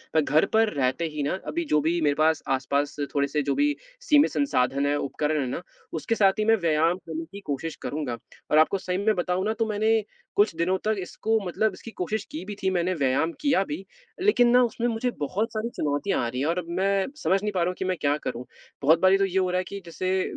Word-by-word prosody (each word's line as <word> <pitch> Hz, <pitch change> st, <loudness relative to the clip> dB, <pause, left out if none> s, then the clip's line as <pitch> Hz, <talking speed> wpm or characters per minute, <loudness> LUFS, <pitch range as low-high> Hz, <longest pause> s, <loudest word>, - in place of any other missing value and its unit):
मैं 160 Hz, -, +5 dB
घर 150 Hz, +2 st, +3 dB
पर 220 Hz, 0 st, +4 dB
रहते 135 Hz, +3 st, 0 dB
ही 150 Hz, -, -1 dB
ना, 140 Hz, -, 0 dB
अभी 340 Hz, +1 st, -2 dB
जो 150 Hz, -, +4 dB
भी 165 Hz, +3 st, +1 dB
मेरे 145 Hz, -2 st, +2 dB
पास 160 Hz, 0 st, +3 dB
आसपास 140 Hz, +2 st, 0 dB, 0.2 s
थोड़े-से 140 Hz, +1 st, +1 dB
जो 140 Hz, -, 0 dB
भी 290 Hz, 0 st, +2 dB, 0.3 s
सीमित 295 Hz, -10 st, +4 dB
संसाधन 140 Hz, -, +1 dB
हैं, 145 Hz, 0 st, +2 dB
उपकरण 150 Hz, +2 st, -1 dB
हैं 130 Hz, -, -2 dB
ना, 125 Hz, -, -4 dB, 0.3 s
उसके 165 Hz, +8 st, -1 dB
साथ 195 Hz, -1 st, +3 dB
ही 215 Hz, -, +1 dB
मैं 225 Hz, 0 st, +5 dB
व्यायाम 165 Hz, +1 st, +2 dB
करने 165 Hz, -2 st, -6 dB
की 200 Hz, -, -8 dB
कोशिश 150 Hz, +3 st, -3 dB
करूँगा। 140 Hz, -6 st, -3 dB, 0.3 s
और 150 Hz, -, +5 dB
आपको 160 Hz, +5 st, +4 dB
सही 185 Hz, -1 st, -3 dB
में 210 Hz, +3 st, +2 dB
बताऊँ 180 Hz, +1 st, -1 dB
ना 215 Hz, -, +1 dB
तो 225 Hz, -, +2 dB
मैंने 220 Hz, +1 st, +2 dB, 0.4 s
कुछ 205 Hz, -2 st, +4 dB
दिनों 175 Hz, +3 st, +1 dB
तक 215 Hz, 0 st, +2 dB
इसको 220 Hz, +4 st, -1 dB
मतलब 210 Hz, +4 st, 0 dB
इसकी 225 Hz, +4 st, -10 dB
कोशिश 210 Hz, +2 st, -3 dB
की 160 Hz, -, -5 dB
भी 205 Hz, +1 st, -6 dB
थी, 190 Hz, -1 st, -1 dB
मैंने 180 Hz, 0 st, +1 dB
व्यायाम 140 Hz, +1 st, +1 dB
किया 270 Hz, -9 st, +3 dB
भी 165 Hz, +5 st, -6 dB, 0.4 s
लेकिन 375 Hz, -12 st, +4 dB
ना 250 Hz, +1 st, +6 dB
उसमें 235 Hz, 0 st, -1 dB
मुझे 235 Hz, +1 st, -1 dB
बहुत 195 Hz, +10 st, -2 dB
सारी 220 Hz, +1 st, -2 dB
चुनौतियाँ 150 Hz, +7 st, 0 dB
आ -, -, -1 dB
रही 125 Hz, +2 st, -4 dB
हैं 145 Hz, -, 0 dB
और 170 Hz, +2 st, 0 dB
अब 180 Hz, -, -6 dB
मैं 195 Hz, 0 st, +2 dB, 0.2 s
समझ 190 Hz, +1 st, +2 dB
नहीं 210 Hz, -, 0 dB
पा 190 Hz, -, -1 dB
रहा 170 Hz, -, +2 dB
हूँ 180 Hz, -, -4 dB
कि 190 Hz, -, -3 dB
मैं 185 Hz, 0 st, 0 dB
क्या 145 Hz, 0 st, +2 dB
करूँ? 125 Hz, -4 st, -5 dB, 0.4 s
बहुत 155 Hz, +4 st, +5 dB
बारी 190 Hz, +1 st, +6 dB
तो 195 Hz, -, +2 dB
ये 190 Hz, 0 st, -2 dB
हो 185 Hz, -1 st, +1 dB
रहा 180 Hz, -, 0 dB
है 185 Hz, -, 0 dB
कि, 200 Hz, -, -6 dB
जैसे 185 Hz, +3 st, -1 dB
180 Hz, 245 wpm, -26 LUFS, 150-210 Hz, 0.4 s, ना